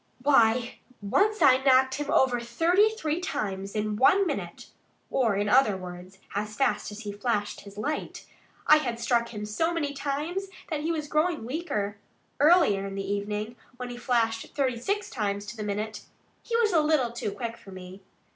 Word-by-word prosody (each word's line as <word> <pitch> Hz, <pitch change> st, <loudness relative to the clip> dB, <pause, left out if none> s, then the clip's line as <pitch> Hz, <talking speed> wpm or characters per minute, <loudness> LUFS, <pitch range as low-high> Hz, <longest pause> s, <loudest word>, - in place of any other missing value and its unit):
Why, 240 Hz, -3 st, +3 dB, 0.2 s
once 410 Hz, -, +1 dB
I 260 Hz, -1 st, +7 dB
knocked 260 Hz, -1 st, +5 dB
him 290 Hz, +2 st, -4 dB
over 255 Hz, -4 st, +3 dB
thirty 330 Hz, -, +3 dB
three 335 Hz, -8 st, -2 dB
times 200 Hz, -, -4 dB
in 210 Hz, 0 st, -1 dB
one 380 Hz, -, +5 dB
minute -, -, -4 dB, 0.5 s
or 230 Hz, -6 st, +2 dB
in 205 Hz, +1 st, 0 dB
other 215 Hz, -3 st, +4 dB
words, 180 Hz, +1 st, -9 dB, 0.2 s
as 210 Hz, +1 st, -3 dB
fast 210 Hz, -6 st, 0 dB
as 210 Hz, +2 st, -8 dB
he 210 Hz, -2 st, -5 dB
flashed 205 Hz, 0 st, -2 dB
his 200 Hz, 0 st, -13 dB
light.... 295 Hz, +9 st, -4 dB, 0.4 s
I 305 Hz, -, +7 dB
had 240 Hz, -6 st, -3 dB
struck 235 Hz, 0 st, +1 dB
him 210 Hz, -2 st, -6 dB
so 325 Hz, +11 st, 0 dB
many 300 Hz, -4 st, -2 dB
times 295 Hz, +8 st, -3 dB, 0.2 s
that 310 Hz, -, -1 dB
he 320 Hz, +2 st, -1 dB
was 305 Hz, -2 st, -3 dB
growing 305 Hz, -3 st, 0 dB
weaker. 230 Hz, -, -3 dB, 0.4 s
Earlier 290 Hz, -, +4 dB
in 195 Hz, -, -6 dB
the 195 Hz, 0 st, -4 dB
evening, 210 Hz, +3 st, -3 dB, 0.2 s
when 250 Hz, -1 st, -6 dB
he -, -, -6 dB
flashed 230 Hz, -3 st, -1 dB
thirty 260 Hz, -4 st, 0 dB
six 405 Hz, -, -2 dB
times 205 Hz, -3 st, -2 dB
to 210 Hz, +2 st, -8 dB
the 220 Hz, -, -7 dB
minute, 210 Hz, +1 st, -3 dB, 0.4 s
he 465 Hz, -, -1 dB
was 440 Hz, -4 st, +2 dB
a 320 Hz, -, +5 dB
little 300 Hz, -6 st, +2 dB
too 235 Hz, -3 st, -4 dB
quick 230 Hz, +3 st, -5 dB
for 235 Hz, -4 st, -16 dB
me." 185 Hz, 0 st, -10 dB
235 Hz, 185 wpm, -27 LUFS, 210-300 Hz, 0.5 s, I